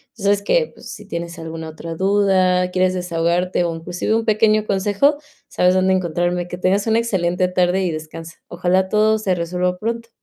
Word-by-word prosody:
Tú 215 - -11
sabes 200 0 +2
que, 475 - +1
pues, - - -13
si - - -11
tienes 170 0 -6
alguna 160 0 -7
otra 160 +1 -7
duda, 185 -1 +2
quieres 185 0 +1
desahogarte, 175 0 0
o 165 -1 -2
inclusive 175 +6 -2
un 225 - 0
pequeño 215 -1 +2
consejo, 205 +9 +1 0.3
sabes 180 0 +2
dónde 185 0 +2
encontrarme. 175 0 -1
Que 180 - -6
tengas 195 +4 +1
una 225 +1 +3
excelente 180 -5 0
tarde 180 +1 +1
y 180 - 0
descansa. 160 +1 -8
Ojalá 185 +2 0
todo 215 +2 +3
se 190 -4 0
resuelva 180 +1 -2
pronto. 230 +3 -4
185 Hz, 180 wpm, -20 LUFS, 175-205 Hz, 0.3 s, una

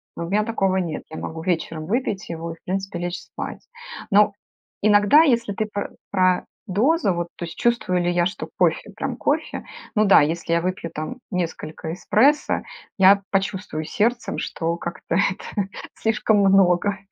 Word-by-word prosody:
Ну, 170 - -4
у - - -7
меня 210 +2 +2
такого 195 -4 0
нет. 170 -4 -2
Я 160 - -6
могу 160 0 -6
вечером 165 -3 -2
выпить 215 0 -2
его 165 0 -5
и 165 - -7
в - - -31
принципе 195 0 -3
лечь 175 0 -3
спать. - - -8 0.4
Но 205 +1 +5 0.5
иногда, 205 +7 +6
если 235 -9 +2
ты 215 +2 -2
пр 205 - -4 0.2
про 185 -2 +2 0.2
дозу, 215 - +2
вот 175 0 -2
то 175 - -4
есть 165 - -9
чувствую 235 -7 +1
ли 175 - +1
я, 175 0 +2
что 190 - -4
кофе - - +1
прям - - -3
кофе, - - -1 0.3
ну 215 - +4
да, 195 - +7
если 165 +3 -1
я 170 - +3
выпью 180 -1 -3
там 155 +11 -5
несколько 165 -2 -4
эспрессо, 275 +11 +2 0.3
я 195 +1 +6
почувствую 190 -5 -2
сердцем, 235 +8 0
что 165 0 -2
как-то 170 -1 -5
это 195 +1 -1 0.3
слишком 220 -1 +2
много. 195 0 +4
190 Hz, 170 wpm, -23 LUFS, 170-210 Hz, 0.5 s, да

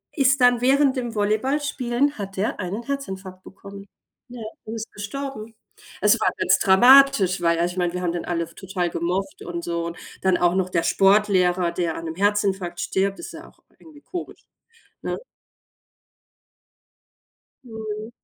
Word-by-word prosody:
ist 270 -3 +3
dann 245 -1 +5
während 270 +1 +3
dem 240 -2 -3
Volleyballspielen 255 +4 0
hat 195 -1 -6
er 205 - -1
einen 200 +5 -4
Herzinfarkt 190 -9 -6
bekommen. 200 0 -12 0.4
Ja, 245 -1 -9 0.2
und 220 - -6
ist 225 0 -6
gestorben. 225 +1 -6 0.5
Es - - +4
war - - +3
ganz - - +3
dramatisch, 235 -1 +6
weil, 170 -1 +2
also 175 +1 0
ich - - -13
meine, 175 -1 0
wir 180 - -3
haben 175 -2 0
den 175 - -4
alle 170 -2 -2
total 185 -2 -3
gemocht 185 +3 -3
und 170 0 -5
so 170 0 -2
und 170 - -7 0.2
dann 190 -1 +2
auch 175 +1 +2
noch 185 -1 0
der 170 -2 0
Sportlehrer, 185 -3 +3
der 170 -2 -2
an 165 - -7
'nem 160 - -5
Herzinfarkt 195 -3 0
stirbt, 195 +1 -1
ist - - -8
ja - - -10
auch - - -27 0.2
irgendwie 310 -3 -16
komisch, 355 +2 -7 0.6
ne? - - -3 2.5
Mhm. 220 -2 -6
200 Hz, 160 wpm, -23 LUFS, 180-240 Hz, 2.5 s, dramatisch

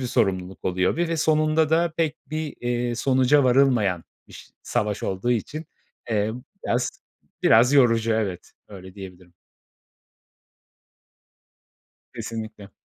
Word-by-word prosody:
bir 130 - -2
sorumluluk 95 -5 -1
oluyor 90 - +1
ve 170 0 0
ve 165 - -1
sonunda 155 0 +2
da 165 0 +2
pek 160 -3 0
bir, 155 -1 -4
eee, 120 0 -1
sonuca 130 +3 +3
varılmayan 120 -9 +3 0.2
biş - - -13
savaş 105 -4 -2
olduğu 95 +5 -2
için, 145 +7 -2 0.4
emm, 110 +2 -1 0.2
biraz 120 +1 0 0.5
Biraz 120 +5 +5
yorucu, 115 -4 +4
evet. 100 -5 -3 0.2
Öyle 95 -2 -11
diyebilirim. 90 -3 -11 2.8
Kesinlikle. 110 -3 -7
120 Hz, 110 wpm, -24 LUFS, 100-140 Hz, 2.8 s, Biraz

